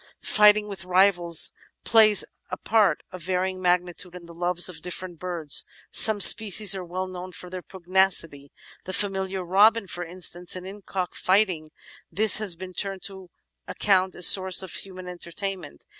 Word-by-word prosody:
Fighting 210 0 +3
with 195 -3 -9
rivals 180 -2 +2 0.3
plays 215 -3 +5 0.2
a - - -6
part 210 -8 0
of 185 -1 -10
varying 185 +1 -3
magnitude 180 0 -2
in 175 -1 -12
the 170 - -14
loves 175 +1 +1
of 170 -3 -5
different 180 -1 -6
birds. 170 -5 -1 0.3
Some 220 -2 +5
species 210 0 +5
are 190 -1 -6
well 180 +2 -5
known 185 0 -10
for 180 +1 -9
their 185 -1 -7
pugnacity, 180 -6 -1 0.3
the 185 - -7
familiar 190 -1 -2
Robin 210 +4 +3
for 175 -1 -6
instance; 175 0 -5
and 185 0 -9
in 200 +2 -11
cock 185 -2 -5
fighting 185 -5 -1 0.4
this 215 +5 +4
has 210 -5 -2
been 185 +1 -10
turned 195 +1 -3
to 190 -2 -7 0.4
account 190 -2 0
as 175 - +4
a - - +11
source 190 -1 +3
of 185 - -8
human 185 -2 -7
entertainment. 180 - -8
185 Hz, 165 wpm, -24 LUFS, 175-195 Hz, 0.4 s, a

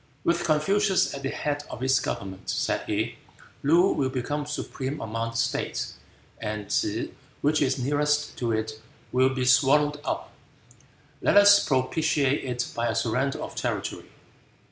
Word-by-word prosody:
"With 170 - +1
Confucius 185 +5 +2
at 140 - -6
the 135 - -2
head 145 +1 -2
of 125 - -6
its 130 0 +3
government," 95 -1 -5
said - - 0
he, - - -1 0.4
"Loo 170 +7 +4
will 135 -2 0
become 145 +3 -3
supreme 145 -1 -4
among 115 +1 -3
the 115 - -6
states, - - -1 0.5
and 105 -2 -4
T'se, - - 0 0.3
which 150 +2 +2
is 130 -2 +2
nearest 145 +3 0
to 120 -2 0
it, 110 0 -2 0.3
will 130 +1 +4
be 130 -1 -2
swallowed 145 +3 +4
up. - - -3 0.9
Let - - +4
us 205 0 +8
propitiate 140 +1 +1
it 125 -1 -2
by 120 0 0
a - - -1
surrender 125 +4 0
of - - -7
territory." - - -3
135 Hz, 150 wpm, -26 LUFS, 125-150 Hz, 0.9 s, us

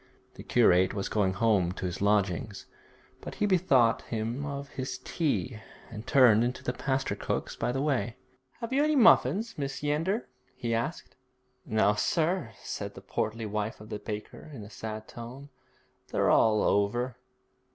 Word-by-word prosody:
The - - -11
curate 90 +2 +3
was 100 - -2
going 95 -3 +1
home 95 -4 +2
to 95 - -5
his 90 +1 -4
lodgings, 100 -1 0 0.6
but - - -7
he - - 0
bethought 150 - +3
him 115 +5 -3
of 140 0 -5
his 130 0 -5
tea, 130 -7 -2 0.3
and 110 0 -8
turned 120 -5 +6
into 125 +1 -2
the 125 - -1
pastry 135 +1 -1
cook's - - -3
by - - -1
the 135 +2 -1
way. 130 -5 0 0.5
'Have 230 +2 -4
you 280 +2 +3
any 305 0 +2
muffins, 225 - +5
Mrs. 140 0 -4
Yeander?' 165 +10 0 0.3
he 115 -1 -2
asked. 120 +8 -3 0.5
'No, 105 -1 +3
sir,' 165 - 0
said - - -5
the - - -10
portly 110 +1 -3
wife 105 +1 -3
of 105 - -12
the 105 - -4
baker, 105 +7 -7
in 130 -7 -8
a 100 - -11
sad 110 +1 -6
tone, 125 +4 -9 0.6
'they're - - +2
all 110 -1 +4
over.' 120 +5 +1
120 Hz, 160 wpm, -29 LUFS, 105-140 Hz, 0.6 s, turned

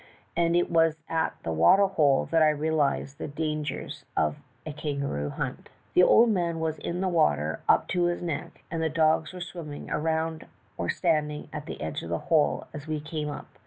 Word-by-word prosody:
And 170 0 +2
it 175 0 +2
was 165 -1 +3
at 165 0 0
the 80 - -2
water 135 - +6
hole 150 -8 +2
that 165 -1 +4
I 155 - +6
realized 145 -2 0
the - - -4
dan 150 +1 -2
gers 150 - -5
of 75 -1 +1 0.3
a 155 - -5
kangaroo 140 - -3
hunt. - - -5 0.2
"The - - +6
old 230 +5 +6
man 170 -4 0
was 160 -1 -2
in 175 +2 -3
the 190 - +1
water 155 - +1
up - - +4
to 180 -1 +1
his 175 0 0
neck 165 -4 -5
and 165 -1 -2
the 160 - +1
dogs 160 0 +2
were 180 -1 -8
swimming 165 -5 -7
around 160 +1 -1 0.3
or 85 - -3
standing 150 -4 0
at 150 0 -6
the - - -6
edge 80 0 -3
of 85 - -7
the 85 - 0 0.2
hole 155 -2 +3
as 145 0 -8
we 155 -1 -2
came 150 0 -4
up. 145 - -9
155 Hz, 200 wpm, -27 LUFS, 145-165 Hz, 0.3 s, water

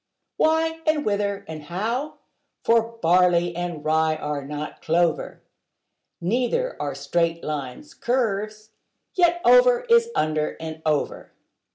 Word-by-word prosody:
Why, 320 +1 +2
and 310 -1 +2
whither, 200 -1 -1
and 155 -1 -7
how? 230 - -3 0.5
for 230 0 +2
barley 175 0 +3
and 175 -3 -4
rye 160 0 +2
are 150 -2 -4
not 150 +2 -6
clover: 165 0 0 0.8
Neither 250 - 0
are 140 -2 -3
straight 165 +4 -1
lines 150 - -5
curves: 215 -3 -2 0.4
yet 345 -1 +3
over - - +6
is 465 0 +5
under 155 0 0
and 160 -1 -7
over. 150 -2 -1
180 Hz, 120 wpm, -23 LUFS, 155-250 Hz, 0.8 s, over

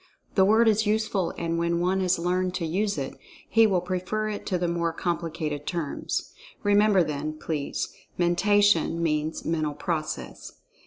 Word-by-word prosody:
The 190 - +5
word 220 +3 +5
is 220 0 +3
useful 210 -4 0
and 170 0 -1
when 170 0 +1
one 185 +2 +1
has 185 -1 +2
learned 180 +1 0
to 170 - -2
use 200 +4 0
it, 135 -2 -5 0.3
he 225 -1 +5
will 185 -4 +1
prefer 185 +4 -2
it 210 - -5
to 185 - +1
the 175 0 -1
more 170 -1 0
complicated 165 -3 -3
terms. 170 -5 -3 0.3
Remember, 205 -2 +4
then, 150 0 -3
please—"Mentation" 175 +4 +1
means 155 0 -1
"Mental 155 -3 -1
Process." 155 0 -4
175 Hz, 150 wpm, -26 LUFS, 165-205 Hz, 0.3 s, The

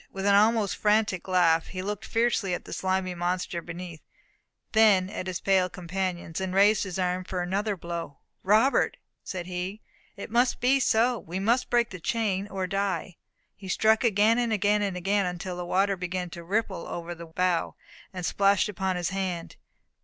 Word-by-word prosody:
With 195 0 -5
an 200 - +4
almost 215 0 +3
frantic 210 -4 +1
laugh, 170 -3 +3
he 185 -1 -5
looked 210 +1 -4
fiercely 225 -5 +1
at - - -8
the - - -7
slimy 185 -1 -1
monster 175 0 -2
beneath, 170 -1 -8 0.7
then 205 -4 +4
at 185 - -5
his 180 -2 -3
pale 190 -2 +2
companions, 180 -2 -4
and 190 0 -3
raised 205 +2 +4
his 185 -2 -5
arm 180 0 -1
for 180 -1 -3
another 200 +3 -1
blow. 170 -4 -6 0.2
"Robert," 220 +8 +3 0.3
said 185 -2 -5
he, 180 +3 -4 0.4
"it 200 - -8
must 245 +2 +2
be 260 +3 +3
so. 240 0 +2
We 175 +3 -6
must 230 +6 +1
break 240 -1 +2
the 185 - -7
chain 200 0 -1
or 190 -2 -3
die." 190 -2 -2 0.4
He 195 - -11
struck 220 +4 +3
again, 220 +1 +3
again, 210 -3 +2
and 195 -3 -1
again, 195 +2 +1
until 180 +1 -4
the 175 0 -5
water 195 +2 +2
began 180 -1 -4
to 170 - -8
ripple 200 0 -2
over 175 0 -5
the 170 0 -10
bow, 180 +1 0 0.4
and 180 -2 -5
splash 200 +2 +3
upon 190 -2 -2
his 175 -1 -1
hand. 185 -3 -3
190 Hz, 175 wpm, -27 LUFS, 180-210 Hz, 0.7 s, an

